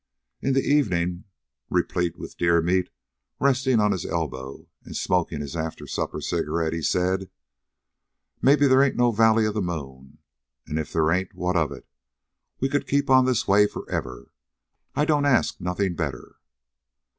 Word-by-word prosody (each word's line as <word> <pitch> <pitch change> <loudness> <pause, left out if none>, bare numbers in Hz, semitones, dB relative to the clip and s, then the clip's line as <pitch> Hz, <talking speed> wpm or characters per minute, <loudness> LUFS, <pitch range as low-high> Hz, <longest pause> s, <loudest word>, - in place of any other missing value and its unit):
In 135 - +1
the 135 - +2
evening, 90 -11 +1 0.4
replete 90 -2 0
with - - -9
deer 85 0 +3
meat, 90 +2 +1 0.5
resting 130 -3 +2
on 105 -1 +3
his 95 -4 -2
elbow 65 -5 -4 0.2
and - - -7
smoking 85 -4 0
his 70 +2 -6
after 80 -1 -4
supper - - -3
cigarette, 80 -1 -1
he 85 - -3
said: 90 +4 0 1.1
"Maybe 145 +2 +5
they 135 0 +5
ain't 140 - +1
no 120 0 +3
valley 110 0 +4
of 105 - -1
the 105 - -1
moon. 70 -5 -6 0.5
An' 75 - -2
if 80 - -5
they 80 - +1
ain't, 90 +4 0
what 90 +1 -1
of 80 -3 +1
it? - - -10 0.7
We 135 - +1
could 145 +1 -1
keep 140 -1 +1
on 130 -1 +6
this 125 -2 0
way 105 +1 +5
forever. 65 -10 -6 0.6
I 150 - +2
don't 150 -2 +2
ask 135 -4 +2
nothing 90 +1 -1
better." 80 -6 -5
90 Hz, 160 wpm, -24 LUFS, 80-125 Hz, 1.1 s, on